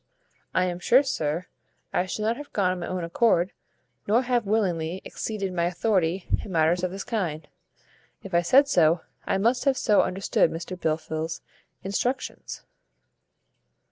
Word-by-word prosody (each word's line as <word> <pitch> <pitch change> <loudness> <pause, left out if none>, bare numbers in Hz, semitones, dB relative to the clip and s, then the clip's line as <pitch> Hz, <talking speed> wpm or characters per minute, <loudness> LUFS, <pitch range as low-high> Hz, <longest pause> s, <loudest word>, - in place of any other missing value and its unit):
"I 185 - +3
am 175 -1 -3
sure, 255 +9 +5
sir, 160 - -2 0.5
I 180 - +1
should 210 - -3
not 225 +2 +1
have 290 +2 -10
gone 190 -3 +2
on 185 - -3
my 175 - -4
own 185 -1 -3
accord, 175 +1 +2 0.6
nor 230 +5 +3
have 240 -4 0
willingly 180 -5 0
exceeded 200 -4 -4
my 170 -1 +1
authority 180 -1 0 0.2
in 200 - -8
matters 165 +1 +2
of 185 - +1
this 195 +2 -6
kind. 180 -10 -3 0.8
If 195 - -9
I 170 - +4
said 265 +11 +5
so, 165 - +3 0.3
I - - +1
must 235 +7 +1
have 270 -2 +3
so 210 -4 +4
understood 190 +1 +1
Mr 170 +3 -6
Blifil's 160 -1 -3 0.4
instructions." 240 +7 -3
185 Hz, 155 wpm, -26 LUFS, 170-220 Hz, 0.8 s, sure